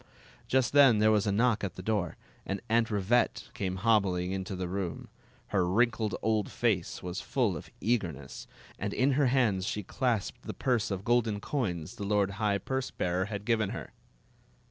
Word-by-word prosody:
Just 130 Hz, 0 st, +2 dB
then 140 Hz, -6 st, +7 dB
there 110 Hz, +1 st, +4 dB
was 105 Hz, -1 st, +2 dB
a -, -, +2 dB
knock 115 Hz, +1 st, +2 dB
at 95 Hz, -4 st, -3 dB
the 90 Hz, -, -8 dB
door, 100 Hz, -5 st, -1 dB, 0.3 s
and 100 Hz, 0 st, -3 dB
Aunt 115 Hz, +1 st, +3 dB
Rivette 105 Hz, +3 st, +1 dB
came 95 Hz, -2 st, -2 dB
hobbling 95 Hz, -3 st, +2 dB
into 95 Hz, 0 st, -3 dB
tY: 90 Hz, -, -3 dB
room. 90 Hz, -1 st, -4 dB, 0.4 s
Her 95 Hz, -3 st, +2 dB
wrinkled 110 Hz, 0 st, +1 dB
old 110 Hz, -2 st, +1 dB
face 105 Hz, -8 st, -1 dB
was 90 Hz, +2 st, -4 dB
full 115 Hz, -7 st, 0 dB
of 75 Hz, -, -8 dB
eagerness, 90 Hz, -, -2 dB, 0.3 s
and 100 Hz, +1 st, -3 dB
in 135 Hz, +2 st, +3 dB
her 140 Hz, 0 st, +3 dB
hands 110 Hz, -7 st, +2 dB
she. 105 Hz, -, -2 dB
clasped 115 Hz, 0 st, -1 dB
the -, -, -7 dB
purse 120 Hz, -5 st, 0 dB
of 100 Hz, 0 st, -4 dB
golden 115 Hz, -3 st, +2 dB
coins 95 Hz, -, -3 dB
the -, -, -5 dB
lord 100 Hz, -1 st, +1 dB
high 105 Hz, -2 st, +2 dB
purse 130 Hz, +6 st, -3 dB
bearer 90 Hz, +1 st, -1 dB
had 100 Hz, 0 st, -5 dB
given 110 Hz, -4 st, +1 dB
her. -, -, -7 dB
105 Hz, 180 wpm, -30 LUFS, 95-115 Hz, 0.4 s, then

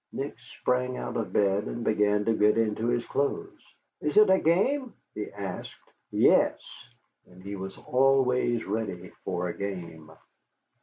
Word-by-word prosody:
Nick -, -, -4 dB
sprang 125 Hz, 0 st, -2 dB
out -, -, -5 dB
of -, -, -2 dB
bed 100 Hz, 0 st, +2 dB
and 120 Hz, -, -5 dB
began 105 Hz, -1 st, +2 dB
to 115 Hz, -, +3 dB
get 105 Hz, 0 st, +3 dB
into 115 Hz, 0 st, 0 dB
his 120 Hz, 0 st, 0 dB
clothes. 140 Hz, 0 st, -2 dB, 0.4 s
"Is 150 Hz, +4 st, -1 dB
it 215 Hz, -2 st, +7 dB
a 190 Hz, -, +5 dB
game?" 240 Hz, -, +1 dB, 0.2 s
he 105 Hz, -, -5 dB
asked. 100 Hz, -3 st, -6 dB, 0.3 s
"Yes." -, -, +4 dB, 0.8 s
He 100 Hz, +1 st, -5 dB
was 95 Hz, 0 st, -7 dB
always 125 Hz, -3 st, +2 dB
ready 100 Hz, -4 st, -3 dB
for 90 Hz, -1 st, -2 dB
a -, -, -3 dB
game. 85 Hz, -6 st, -6 dB
110 Hz, 145 wpm, -28 LUFS, 100-125 Hz, 0.8 s, it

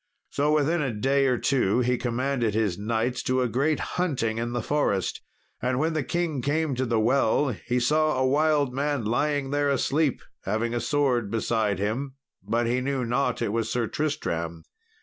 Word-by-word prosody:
So 145 Hz, +1 st, +1 dB
within 155 Hz, +3 st, +2 dB
a 135 Hz, -4 st, -1 dB
day 135 Hz, +6 st, +1 dB
or 125 Hz, -1 st, +2 dB
two 125 Hz, -4 st, +2 dB
he 125 Hz, +1 st, +2 dB
commanded 120 Hz, -2 st, -1 dB
his 105 Hz, -5 st, +1 dB
knights 115 Hz, +4 st, -1 dB
to 130 Hz, 0 st, +1 dB
a -, -, +1 dB
great 140 Hz, +6 st, +1 dB, 0.2 s
hunting 115 Hz, -10 st, -1 dB
in 120 Hz, +1 st, -2 dB
the 120 Hz, -2 st, -2 dB
forest. 115 Hz, -9 st, 0 dB, 0.4 s
And 125 Hz, 0 st, 0 dB
when 160 Hz, +4 st, +1 dB
the 155 Hz, -, 0 dB
king 160 Hz, -1 st, -1 dB
came 150 Hz, +2 st, 0 dB
to 130 Hz, 0 st, -1 dB
the 115 Hz, -1 st, +1 dB
well, 135 Hz, +4 st, +2 dB
he 125 Hz, +2 st, -2 dB
saw 155 Hz, +3 st, +2 dB
a 130 Hz, -, +2 dB
wild 145 Hz, -1 st, +2 dB
man 140 Hz, -3 st, -1 dB
lying 140 Hz, +4 st, 0 dB
there 145 Hz, 0 st, +1 dB
asleep, 140 Hz, +1 st, +1 dB, 0.2 s
having 110 Hz, +4 st, -1 dB
a 120 Hz, -, 0 dB
sword 125 Hz, -4 st, +1 dB
beside 110 Hz, -2 st, 0 dB
him; 120 Hz, +7 st, -2 dB, 0.3 s
but 120 Hz, +1 st, 0 dB
he 125 Hz, +2 st, 0 dB
knew 135 Hz, -1 st, -1 dB
not 125 Hz, +1 st, 0 dB
that 120 Hz, -, -1 dB
it -, -, -2 dB
was 115 Hz, -1 st, -1 dB
Sir 120 Hz, -2 st, 0 dB
Tristram. 85 Hz, -, -3 dB
125 Hz, 190 wpm, -26 LUFS, 115-145 Hz, 0.4 s, within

